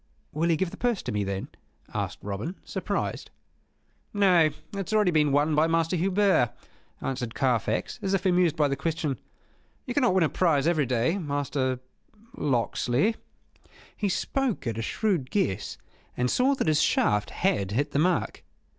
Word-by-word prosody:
"Will 160 +3 0
he 165 - +4
give 185 +1 -1
the - - -9
purse 240 -5 0
to - - -3
me, 105 -1 0
then?" 95 0 -4 0.4
asked - - -3
Robin, 105 - -4
surprised. - - -3 0.9
"Nay, 180 -6 +5 0.2
that 200 -3 -4
has - - -3
already 210 -4 +4
been 150 -3 +3
won 145 +3 +2
by 155 +2 +4
Master 165 +1 +1
Hubert," 190 - +2 0.5
answered 125 -3 -3
Carfax, 120 -5 0
as 195 0 +1
if 190 0 -2
amused 180 -4 +3
at 150 - +4
the - - +1
question. 155 -1 -2 0.7
"You 250 - -3
cannot 245 -7 +3
win 185 - +4
a 155 - +2
prize 155 -6 +2
every 155 -5 +2
day. 125 +10 +1
Master 140 -4 -1 0.5
Locksley." 130 - +1 0.8
He 205 - -1
spoke 265 +4 -1
at 115 -2 -2
a - - -1
shrewd 175 - -1
guess, 105 - -1 0.4
and 125 0 +1
saw 265 +3 +3
that - - -1
his 155 0 +3
shaft 105 -8 +2
had 100 - 0
hit 140 +8 -1
the 140 - 0
mark. 175 +1 0
155 Hz, 165 wpm, -27 LUFS, 130-190 Hz, 0.9 s, Nay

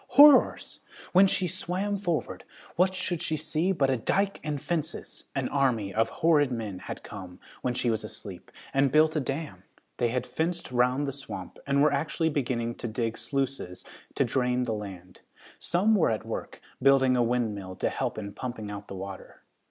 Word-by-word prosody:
Horrors! 290 -1 +7 0.3
when 190 +2 +7
she 185 -1 +1
swam 190 +4 -2
forward, 170 - -2 0.3
what 185 +2 +3
should 180 -2 -2
she 155 - 0
see 155 +4 0
but 140 -7 +2
a 130 - +1
dyke 195 - 0
and 150 -2 -2
fences! 160 +1 -3
An 135 -2 0
army 120 -8 +1
of 115 +1 +2
horrid 145 +1 +3
men 110 -6 -4
had - - -7
come, 90 -2 -9 0.2
when 125 -1 -1
she 120 -1 +1
was 110 -1 -1
asleep, 95 -4 -9 0.2
and 135 -1 +3
built 155 +1 +4
a - - +3
dam. 135 - -4 0.4
They 120 - +2
had 125 +1 -1
fenced 170 -2 -2
round 125 +3 +2
the 140 - -2
swamp 140 0 -6
and 140 +1 +3
were 150 - +4
actually 155 +3 0
beginning 120 -5 -1
to - - -4
dig 115 0 -2
sluices 135 -10 -3 0.3
to - - +2
drain 125 -1 +1
the 115 -3 -1
land. 95 -4 -8 0.4
Some 195 +6 +2
were 195 -7 +4
at 110 -1 -2
work, - - -6 0.2
building 135 -1 +5
a 125 - +3
windmill 110 -6 -1
to - - 0
help - - -2
in 100 -2 -5
pumping 110 -4 -5
out 100 0 -7
the - - -7
water. 95 0 -8
130 Hz, 185 wpm, -28 LUFS, 115-155 Hz, 0.4 s, Horrors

